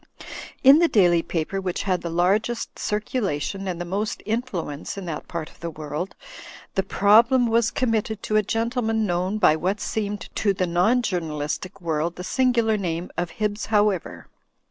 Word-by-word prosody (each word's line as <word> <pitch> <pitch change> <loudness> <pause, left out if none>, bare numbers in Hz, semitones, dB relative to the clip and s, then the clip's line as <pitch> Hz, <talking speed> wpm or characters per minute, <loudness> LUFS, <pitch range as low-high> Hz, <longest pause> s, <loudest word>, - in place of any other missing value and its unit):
In 275 +3 +8
the 340 - +5
daily 175 - +4
paper 175 +4 -3
which 185 -2 -2
had 185 -3 0
the 170 - -4
largest 200 +8 0
circulation 195 - -2
and 175 -2 -3
the 175 - -3
most 200 +5 -3
influence 200 - -3
in 195 - -5
that 160 -3 -5
part 165 -3 -4
of - - -23
the 170 - -4
world, 155 +3 -5 0.6
the 195 - +2
prob 205 +4 +5
lem 255 -2 +4
was; 230 -1 +2
committed 220 -3 -1
to 215 - -1
a 215 - +5
gentleman 225 0 0
known 180 +2 -1
by 155 -7 +5
what 185 +6 -1
seemed 205 -1 -3
to 205 -2 +2
the 185 -1 0
non 180 +9 +2
journalistic 170 0 -3
world 165 0 -1
the 180 - -7
singular 235 -1 +2
name 175 -2 -3
of 175 -1 -2
Hibbs 210 -1 -2
However. 205 -4 +1
195 Hz, 170 wpm, -24 LUFS, 175-220 Hz, 0.6 s, In